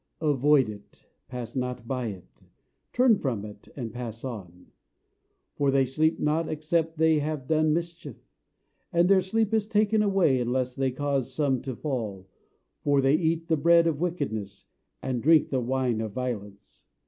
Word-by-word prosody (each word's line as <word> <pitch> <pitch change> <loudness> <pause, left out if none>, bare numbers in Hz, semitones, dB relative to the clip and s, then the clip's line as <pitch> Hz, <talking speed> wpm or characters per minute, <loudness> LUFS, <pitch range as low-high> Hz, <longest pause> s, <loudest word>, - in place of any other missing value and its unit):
Avoid 145 -3 +3
it, 105 -1 -11 0.2
Pass 125 -2 -7
not 125 -2 -3
by 125 -2 -2
it; 95 -5 -10 0.5
Turn 245 -4 +4
from 115 -7 -2
it, 105 -1 -12
And 120 -5 -5
pass 115 -2 -6
on. 90 -8 -8 0.8
For 140 -1 +1
they 135 0 +3
sleep 155 +5 +1
not, 155 +2 0
except 160 +1 -1
they 160 -1 +4
have 150 -2 -3
done 155 0 +2
mischief; 170 +1 -4 0.7
And 170 -1 +3
their 195 0 +5
sleep 220 +3 0
is 215 -2 +1
taken 215 0 +2
away, 195 -10 +3
unless 125 +1 -1
they 135 -1 0
cause 135 -1 -1
some 140 -4 0
to 130 -3 -5
fall. 110 -10 -4 0.6
For 145 -1 +3
they 135 +1 +3
eat 165 +1 +1
the 160 -2 +2
bread 170 +3 +5
of 160 -2 0
wickedness, 110 - -3 0.4
And 130 -2 -2
drink 155 +2 +4
the 130 -2 +1
wine 125 -2 0
of 110 -2 -4
violence. 105 -6 -6
140 Hz, 160 wpm, -27 LUFS, 125-160 Hz, 0.8 s, their